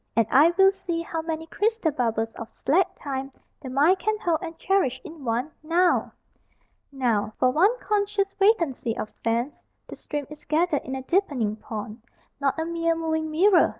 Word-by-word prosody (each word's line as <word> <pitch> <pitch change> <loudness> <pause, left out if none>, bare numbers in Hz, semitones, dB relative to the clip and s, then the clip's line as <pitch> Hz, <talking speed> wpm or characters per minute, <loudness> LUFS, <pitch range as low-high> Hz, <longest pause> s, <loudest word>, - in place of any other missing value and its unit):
And 230 0 +4
I 300 +6 +6
will 385 0 +7
see 355 -4 -4
How 325 -1 -3
many 320 0 -4
crystal 415 0 0
bubbles 225 -4 -1
of 225 - -8
slack 350 +7 0
Time 270 -1 -4 0.3
The 265 - -7
mind 300 +9 +3
can 430 +4 0
hold 340 -7 0
and 330 -2 -7
cherish 360 -9 +1
in 325 -5 -10
one 245 +5 -1
Now! 340 +3 +2 0.8
Now, 230 -6 0
for 255 - +3
one 390 - +3
conscious 405 -1 0
vacancy 335 - +1
of 215 - -4
sense, 235 +5 -3 0.2
The - - -9
stream 295 -1 -5
is 300 - -11
gathered 315 -1 +1
in 265 - -4
a 265 - -5
deepening 265 - 0
pond, 215 +1 -7 0.4
Not 275 0 0
a 320 - -1
mere 335 0 0
moving 315 -1 -1
mirror. 355 +4 +5
315 Hz, 175 wpm, -25 LUFS, 260-360 Hz, 0.8 s, will